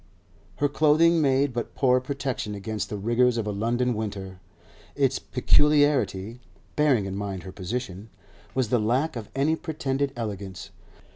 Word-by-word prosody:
Her 145 Hz, -, +1 dB
clothing 155 Hz, +3 st, +4 dB
made 135 Hz, -1 st, +2 dB
but 120 Hz, -1 st, -4 dB
poor 130 Hz, -2 st, +3 dB
protection 130 Hz, -5 st, -3 dB
against 105 Hz, +1 st, -4 dB
the 105 Hz, -, -4 dB
rigours 120 Hz, +4 st, +2 dB
of 115 Hz, -, -1 dB
a 105 Hz, -, -2 dB
London 120 Hz, +4 st, 0 dB
winter. 100 Hz, -4 st, -5 dB, 0.6 s
Its -, -, +1 dB
peculiarity 145 Hz, -8 st, +2 dB, 0.4 s
(bearing 140 Hz, -9 st, +3 dB
in 95 Hz, 0 st, -4 dB
mind 100 Hz, -3 st, -4 dB
her 95 Hz, -, -8 dB
position) 100 Hz, +1 st, -5 dB, 0.5 s
was 130 Hz, -4 st, +1 dB
the 125 Hz, -, +3 dB
lack 130 Hz, +8 st, 0 dB
of 110 Hz, -3 st, -6 dB
any 145 Hz, +4 st, +2 dB
pretended 140 Hz, -4 st, -2 dB
elegance. 100 Hz, -5 st, -6 dB
120 Hz, 145 wpm, -26 LUFS, 105-140 Hz, 0.6 s, clothing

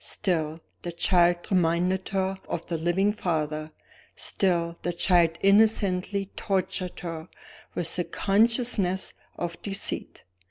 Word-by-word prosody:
Still, 160 Hz, -5 st, 0 dB, 0.2 s
the 175 Hz, -, -4 dB
child 175 Hz, 0 st, +3 dB
reminded 180 Hz, +1 st, +1 dB
her 190 Hz, 0 st, -1 dB
of 170 Hz, -, -3 dB
the 170 Hz, -, -2 dB
living 190 Hz, +5 st, +2 dB
father; 155 Hz, -5 st, -2 dB, 0.5 s
still, 170 Hz, -3 st, +1 dB
the 175 Hz, -, -2 dB
child 170 Hz, -2 st, +3 dB
innocently 200 Hz, -1 st, +3 dB
tortured 185 Hz, -2 st, -2 dB
her 165 Hz, -1 st, -5 dB, 0.5 s
with 170 Hz, -2 st, -1 dB
the 175 Hz, -, +1 dB
consciousness 210 Hz, -2 st, +1 dB, 0.2 s
of 170 Hz, -1 st, -4 dB
deceit. 200 Hz, -1 st, -3 dB
180 Hz, 115 wpm, -27 LUFS, 170-195 Hz, 0.5 s, child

